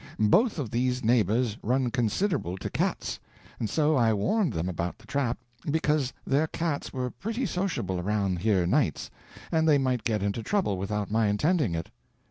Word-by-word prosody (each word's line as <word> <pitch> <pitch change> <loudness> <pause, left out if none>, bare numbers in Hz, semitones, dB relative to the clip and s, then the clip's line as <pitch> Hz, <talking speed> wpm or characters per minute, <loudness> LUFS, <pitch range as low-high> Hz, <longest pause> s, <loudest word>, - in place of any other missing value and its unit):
Both 185 - +4
of 130 -8 -3
these 125 +1 0
neighbors 110 0 +2
run 125 +1 +1
considerable 120 - 0
to - - -5
cats, - - -1 0.4
and 110 - -2
so 155 +5 +2
I 115 -4 +4
warned 185 - +1
them 80 -2 -2
about 85 -1 -3
the 110 - -19
trap, 130 -1 -1 0.3
because 150 -3 +1
their 145 +4 +2
cats 160 -2 -2
were 125 -2 -3
pretty 230 +5 -3
sociable 155 - -2
around 100 -1 0
here 95 -2 +2
nights, 105 - +1 0.4
and 160 -1 +3
they 145 - +6
might 130 -4 0
get 105 -3 0
into 100 +3 -1
trouble 165 - 0
without 105 +1 -2
my 110 0 +3
intending 120 - +1
it. 80 - -5
120 Hz, 170 wpm, -27 LUFS, 105-150 Hz, 0.4 s, they